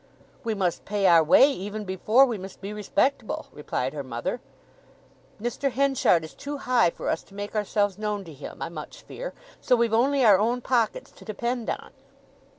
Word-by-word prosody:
"We 225 -2 -1
must 185 -4 -1
pay 205 -1 -1
our 170 -3 +7
way 265 - +6
even 205 -1 -5
before 215 +8 +4
we 235 -6 -3
must 190 +1 -9
be 200 +1 -6
respectable," 215 +4 -1
replied 135 -2 -3
her 145 - -4
mother. 130 - -4 1.0
"Mr. 240 +5 -1
Henchard 265 -10 +2
is 160 - -9
too 290 +1 -6
high 255 -8 +3
for - - -7
us 160 - 0
to 195 - -19
make 205 0 -5
ourselves 205 -1 0
known 210 -1 -2
to 165 -4 -11
him, 140 - -8
I - - -4
much - - -9
fear; - - -7 0.2
so 250 - +3
we've 235 -2 +1
only 265 +3 +3
our 200 -4 +7
own 235 +4 +1
pockets 245 - 0
to - - -16
depend 235 +2 -3
on." - - -4
215 Hz, 185 wpm, -26 LUFS, 190-245 Hz, 1.0 s, our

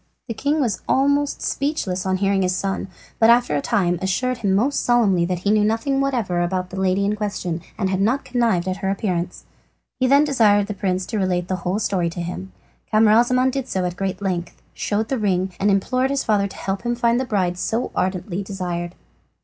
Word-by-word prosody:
The 230 - -3
king 285 +7 0
was 235 -8 0
almost 285 +1 +2
speechless 200 -11 -2
on 185 0 +1
hearing 195 0 +1
his 180 -1 +1
son, 195 +1 -2 0.3
but 225 - +5
after 240 -8 +4
a 145 - 0
time 175 0 +1
assured 240 +7 -1
him 195 -3 +1
most 255 +8 +1
solemnly 205 -8 +3
that 180 0 -1
he 200 - +3
knew 210 -1 +4
nothing 225 +6 +1
whatever 230 -11 0
about 185 +1 -2
the 190 - -5
lady 190 +1 +2
in 205 +1 0
question, 190 -5 -3 0.2
and 190 - 0
had 190 0 0
not 240 +7 +1
connived 230 -8 +1
at 185 0 -1
her 195 -1 -2
appearance. 180 -3 -2 0.5
He 255 - +3
then 280 +3 +5
desired 215 -8 +3
the 210 - -4
prince 185 -1 -1
to 220 - -3
relate 180 -2 0
the 185 - 0
whole 180 +2 -2
story 190 -5 0
to 170 - -7
him. 170 - -5 0.4
Camaralzaman 235 +4 +4
did 270 -1 -3
so 185 -1 -1
at 175 -1 -3
great 195 +1 -3
length, 175 -3 -3
showed 215 +1 -1
the 265 - -1
ring, 190 -2 0
and 205 - +2
implored 255 +7 +1
his 280 0 0
father 205 -2 +2
to 195 - -12
help 195 0 -3
to 240 0 -1
find 235 0 +2
the - - 0
bride 190 -7 0
he - - -16
so 225 +6 -2
ardently 185 0 -2
desired. 180 -3 -4
200 Hz, 215 wpm, -22 LUFS, 185-235 Hz, 0.5 s, but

